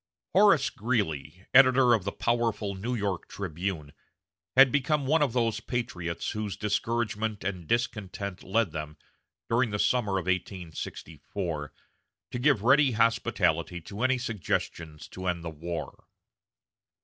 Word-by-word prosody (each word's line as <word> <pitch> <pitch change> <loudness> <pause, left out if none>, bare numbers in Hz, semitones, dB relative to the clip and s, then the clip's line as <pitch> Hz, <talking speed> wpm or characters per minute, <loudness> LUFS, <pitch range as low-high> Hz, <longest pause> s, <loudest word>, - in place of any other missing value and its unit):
Horace 195 -8 +5
Greeley, 100 - -2
editor 130 -1 +7
of 105 -5 +1
the 100 - -1
powerful 115 -4 0
New 115 +6 -3
York 100 -5 -2
"Tribune," 85 -5 -4 0.6
had 135 0 +8
become 145 +1 +1
one 155 +4 +3
of 140 -6 +2
those 115 -2 +1
patriots 105 -9 -3
whose 105 -2 -4
discouragement 110 0 -1
and 90 -4 -4
discontent 100 -5 -2
led 100 -1 0
them, 75 -1 -6 0.5
during 120 +1 +2
the 105 - -2
summer 105 -2 +1
of 95 - -3
1864, 85 -3 -4 0.6
to 125 - -3
give 130 -5 +3
ready 135 +1 +5
hospitality 115 -5 +1
to 100 +6 -8
any 130 0 +3
suggestions 85 -8 -3
to 95 0 -6
end 85 -2 -1
the 85 - -4
war. 80 -1 -6
105 Hz, 130 wpm, -28 LUFS, 90-120 Hz, 0.6 s, had